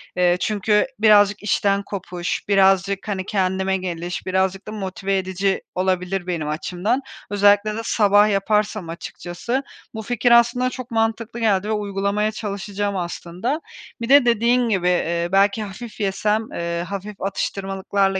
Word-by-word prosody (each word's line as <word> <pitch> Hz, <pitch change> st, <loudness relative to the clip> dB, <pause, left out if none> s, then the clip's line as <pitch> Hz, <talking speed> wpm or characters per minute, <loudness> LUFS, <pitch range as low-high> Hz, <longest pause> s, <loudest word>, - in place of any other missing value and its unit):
eee, 180 Hz, 0 st, +3 dB
çünkü 210 Hz, +2 st, +1 dB
birazcık 205 Hz, -2 st, +5 dB
işten 200 Hz, -1 st, +1 dB
kopuş, 180 Hz, -3 st, -4 dB
birazcık, 195 Hz, 0 st, +3 dB
hani, 190 Hz, -3 st, -2 dB
kendime 190 Hz, -1 st, 0 dB
geliş, 175 Hz, -1 st, -5 dB
birazcık 190 Hz, +1 st, 0 dB
da -, -, -5 dB
motive 195 Hz, -1 st, -2 dB
edici 190 Hz, +1 st, -1 dB
olabilir 185 Hz, 0 st, -1 dB
benim 165 Hz, -4 st, -2 dB
açımdan. 180 Hz, -, -1 dB, 0.3 s
Özellikle 205 Hz, +1 st, +3 dB
de 225 Hz, -, -3 dB
sabah 205 Hz, -1 st, +4 dB
yaparsam 210 Hz, -2 st, 0 dB
açıkçası 175 Hz, +9 st, -4 dB, 0.3 s
bu 220 Hz, -, -5 dB
fikir 240 Hz, +2 st, 0 dB
aslında 240 Hz, +1 st, +4 dB
çok 255 Hz, -1 st, -8 dB
mantıklı 225 Hz, +1 st, -1 dB
geldi 205 Hz, -3 st, +1 dB
ve -, -, -1 dB
uygulamaya 205 Hz, 0 st, -1 dB
çalışacağım 205 Hz, -1 st, -3 dB
aslında. 180 Hz, -, -3 dB, 0.4 s
Bir 230 Hz, -, -3 dB
de 280 Hz, -1 st, +7 dB
dediğin 235 Hz, +1 st, +3 dB
gibi, 185 Hz, -4 st, +1 dB
ııı, 170 Hz, -1 st, 0 dB
belki 200 Hz, +2 st, +3 dB
hafif 215 Hz, +3 st, -9 dB
yesem, 210 Hz, +2 st, +1 dB
ııı, 170 Hz, 0 st, -3 dB
hafif 200 Hz, +2 st, -7 dB
atıştırmalıklarla 195 Hz, 0 st, -1 dB
200 Hz, 140 wpm, -21 LUFS, 185-215 Hz, 0.4 s, de